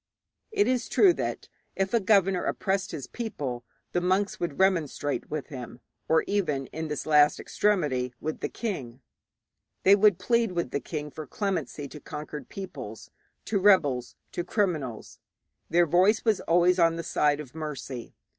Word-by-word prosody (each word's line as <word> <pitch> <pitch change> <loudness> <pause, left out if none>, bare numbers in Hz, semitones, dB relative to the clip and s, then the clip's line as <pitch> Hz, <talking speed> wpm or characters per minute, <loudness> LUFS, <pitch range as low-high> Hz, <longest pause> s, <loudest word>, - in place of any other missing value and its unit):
It 410 -2 +2
is 255 -1 0
true 380 -4 +6
that, - - -4 0.3
if 195 +2 -1
a 235 - +5
governor 195 -2 +3
oppressed 190 0 -1
his 145 -6 -5
people, 140 - -5 0.3
the 175 - 0
monks 190 +3 +1
would 170 -5 -3
remonstrate 165 -6 0
with 155 -2 -4
him, 125 -3 -8 0.3
or 160 0 +4
even, 150 -10 0
in 160 +1 -3
the 150 -1 -3
last 150 -1 +5
extremity, 145 -12 0
with 155 0 -4
the - - -3
king; 135 - -5 0.8
they 195 +1 +7
would 205 -3 +5
plead 235 -4 +1
with 170 -7 -2
the - - 0
king 150 0 -5
for 155 0 -8
clemency 165 - -3
to 150 - -10
conquered 150 +1 -7
peoples, 140 - -8 0.3
to 205 - 0
rebels, 145 -11 +3 0.2
to 175 - -3
criminals; 165 - -2 0.5
their 175 +1 +4
voice 185 +8 +3
was 220 -3 +2
always 175 +2 +3
on 165 -1 +4
the 170 - -4
side 150 -1 +1
of 140 -3 -9
mercy. 140 -6 -6
165 Hz, 160 wpm, -27 LUFS, 145-195 Hz, 0.8 s, they